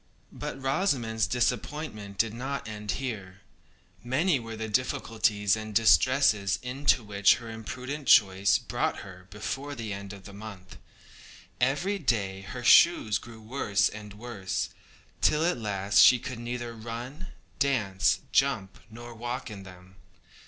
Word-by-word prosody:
But - - -6
Rosamond's 130 - 0
disappointment 120 -2 -2
did 115 -1 +1
not 135 +3 -4
end 105 -1 -4
here. 105 -7 -6 0.6
Many 135 +6 +1
were 115 -1 -7
the 110 0 -4
difficulties 110 -4 +1
and 110 -1 -7
distresses 110 - +4
into 125 0 +1
which 100 -1 +4
her 115 -1 -8
imprudent 130 +5 -6
choice 100 -1 +5
brought - - -2
her 90 -2 -12
before 135 +8 -5
the 110 -4 -5
end 100 0 -7
of 100 -2 -11
the 100 - -11
month. 100 -3 -10 0.8
Every 145 +11 +1
day 100 - -1
her 115 +6 -7
shoes 120 - +6
grew 115 -1 -12
worse 105 -4 +1
and 105 -1 -10
worse, 105 -4 -4 0.5
till 155 +2 +3
at 175 -7 0
last 100 -2 +1
she 125 - +8
could 130 -1 -7
neither 120 0 -5
run, 120 +9 -7 0.3
dance, 105 -9 +1
jump, 110 -9 +1
nor 120 +2 -10
walk 120 +1 -5
in 100 -2 -8
them. 95 0 -14
115 Hz, 140 wpm, -28 LUFS, 100-130 Hz, 0.8 s, she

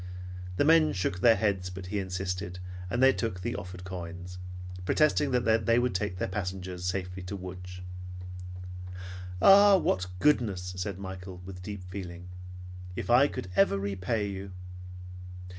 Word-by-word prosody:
The - - +4
men 160 0 +6
shook 95 -1 -1
their 115 +4 +7
heads, 100 -5 0
but 90 +1 -7
he 100 +3 -2
insisted, 90 -1 -3 0.3
and 120 +6 +1
they 135 0 +8
took 115 -6 -2
the - - -2
offered 90 0 -7
coins, 90 0 -6 0.4
protesting 150 +7 +3
that 115 -4 +2
they 115 0 +5
would 125 0 +2
take 90 -1 -1
their - - -1
passengers 95 -2 -4
safely 90 0 -2
to 90 +3 -5
Lodz. 90 -1 -7 1.6
"Ah! 200 0 +9
What 90 - +1
goodness!" 100 -8 +2
said 95 +1 -3
Michael 95 -1 -7
with 90 -1 -8
deep 100 0 -6
feeling. 90 -1 -7 0.7
"If 115 - -2
I 130 +4 +7
could 90 -9 -6
ever 100 0 +5
repay 100 +2 -1
you!" 95 -1 -6
95 Hz, 145 wpm, -29 LUFS, 90-110 Hz, 1.6 s, Ah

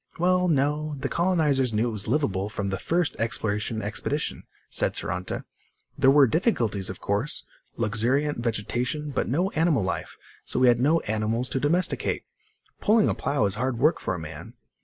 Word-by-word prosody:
"Well, 180 +1 +3
no, 150 0 +1
the 140 +1 -2
colonizers 150 -8 +2
knew 110 +3 +1
it - - -4
was 105 -2 -3
liveable, 105 -7 0
from 100 -2 -3
the 95 - -2
first 170 -1 0
exploration 110 -1 -1
expedition," 100 - -3 0.2
said - - 0
Saranta. - - -3 0.5
"There 135 - +4
were 140 0 +7
difficulties, 115 - 0
of 95 - -6
course. 105 +9 -2 0.3
Luxuriant 120 +6 0
vegetation, 120 +6 -2
but - - -1
no 175 +9 +1
animal 160 - +2
life, 95 - -4 0.3
so - - -2
we 130 -1 +6
had 120 -1 +3
no 155 +6 +3
animals 110 +3 -1
to 135 - -1
domesticate. 170 +7 0 0.6
Pulling 215 0 +4
a - - +1
plow 140 -7 0
is 100 - 0
hard 130 -2 0
work 150 +7 +3
for 95 - -2
a - - -5
man." 80 -2 -9
130 Hz, 170 wpm, -26 LUFS, 110-150 Hz, 0.6 s, were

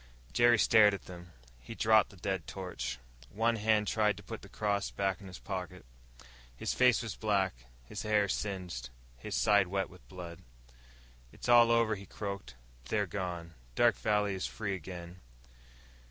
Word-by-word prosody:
Jerry 120 0 +5
stared 105 -2 +6
at 100 - -10
them. 90 -1 -11 0.3
He 115 - -9
dropped 110 -2 +4
the - - -15
dead 95 -2 -3
torch. 90 -9 -5 0.3
One 115 +5 +1
hand 105 0 +2
tried 105 -1 +2
to 105 - -11
put 115 - -7
the - - -13
cross 100 -2 -1
back 95 -2 -1
into 95 - -10
his 90 - -9
pocket. 95 -4 -6 0.7
His - - -2
face 125 -2 +4
was 110 -6 -5
black, 100 -4 +1 0.3
his - - -6
hair 105 -1 +2
singed, 90 - -3 0.3
his - - -5
side 100 -3 +4
wet 95 +1 -2
with 90 - -17
blood. 85 -2 -8 0.9
"It's - - -8
all 120 -1 +7
over," 115 -1 +3
he 100 -2 -7
croaked. 100 - -6 0.3
"They're 105 - 0
gone. 90 -2 -5 0.2
Dark - - +4
Valley 105 -2 +1
is 95 - -2
free 105 -3 -3
again." 90 0 -8
100 Hz, 165 wpm, -32 LUFS, 90-110 Hz, 0.9 s, all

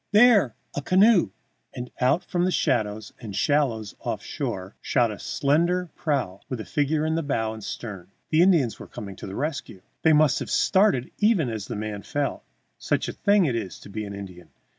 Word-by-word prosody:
There! 210 - +6 0.2
A 145 - -1
canoe!" 185 - +5 0.5
And 125 0 -6
out 130 +7 +3
from 175 -1 0
the 185 - +2
shadows 110 - 0
and 105 -5 -7
shallows 120 -8 +1
off - - -4
shore 95 +1 -4
shot 120 -4 +2
a 105 - -8
slender 170 +5 +1
prow 130 - -1
with 130 - -3
a 110 - -5
figure 150 +1 0
in 160 - 0
bow 110 -5 0
and 110 -1 -9
stern. 100 -6 -7 0.2
The 155 +1 +5
Indians 160 - +3
were - - -9
coming 100 -2 -8
to - - -8
the 95 - -6
rescue! 140 - -4 0.2
They 160 - +5
must 150 -2 +4
have - - -5
started 190 - +3
even 205 - +3
as 110 -3 -5
the 120 - -4
man 105 -1 -4
fell, 145 +3 -2 0.4
such - - 0
a - - -4
thing 200 -2 +3
it 130 -6 0
is 105 -5 -4
to - - -12
be 110 +1 -4
an 100 -1 -6
Indian! 90 -4 -10
130 Hz, 195 wpm, -25 LUFS, 105-160 Hz, 0.5 s, There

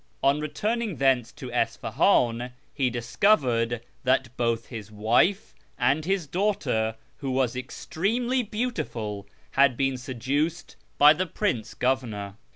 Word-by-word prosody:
On 140 +2 +4
returning 210 +7 -2
thence 130 -4 +2
to 130 -2 -8
Isfahan 120 - +1 0.2
he 135 -3 +1
dis 120 -1 -6
covered 120 - +3 0.2
that 130 -1 +1
both 115 -1 0
his 110 -4 -8
wife 120 - +2 0.2
and 140 +5 +2
his 190 -2 0
daughter 145 - 0 0.2
(who 140 - -4
was 130 -2 +1
extremely 225 - -1
beautiful) 195 - -4 0.2
had 135 -3 +4
been 135 -2 0
seduced 140 +7 -2 0.2
by 150 +1 +8
the 185 +4 -2
prince 120 - -2
governor. 115 -7 -1
130 Hz, 125 wpm, -26 LUFS, 115-165 Hz, 0.2 s, by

